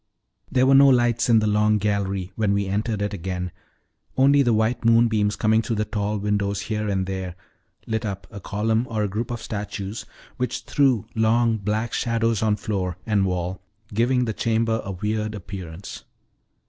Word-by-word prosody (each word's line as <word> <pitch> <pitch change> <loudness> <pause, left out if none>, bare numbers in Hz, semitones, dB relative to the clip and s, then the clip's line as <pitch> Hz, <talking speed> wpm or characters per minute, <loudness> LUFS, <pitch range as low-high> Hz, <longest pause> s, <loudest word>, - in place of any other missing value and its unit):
There 130 -1 +3
were 135 - +5
no 140 +1 +8
lights 120 -2 +3
in 115 - +6
the 110 - +2
long 105 0 +3
gallery 100 -2 -1
when 105 -3 +1
we 100 0 0
entered 105 +2 -1
it 105 0 -2
again, 90 -1 -4 0.7
only 140 +2 +5
the 120 -3 +3
white 110 +2 +1
moonbeams 115 -3 +3
coming 110 +1 +3
through 115 - -2
the 105 0 0
tall 105 0 -2
windows 100 -1 -1
here 105 -1 -2
and 95 -2 0
there 95 -2 -4 0.5
lit 110 -1 -2
up 100 -3 -4
a 100 - -8
column 110 +5 0
or 110 -2 -1
a - - +1
group 110 +4 -3
of 120 -1 -5
statues, 105 0 -5 0.3
which 125 -1 -2
threw 135 -7 +2
long, 115 +1 +2
black 110 +3 -2
shadows 115 -2 0
on 110 -1 +2
floor 95 -4 -3
and 100 -3 +2
Wall, 90 0 -3 0.3
giving 125 +3 +2
the 110 - -2
chamber 115 0 0
a 100 - -5
weird 105 +3 -2
appearance. 95 -2 -8
105 Hz, 175 wpm, -23 LUFS, 100-115 Hz, 0.7 s, no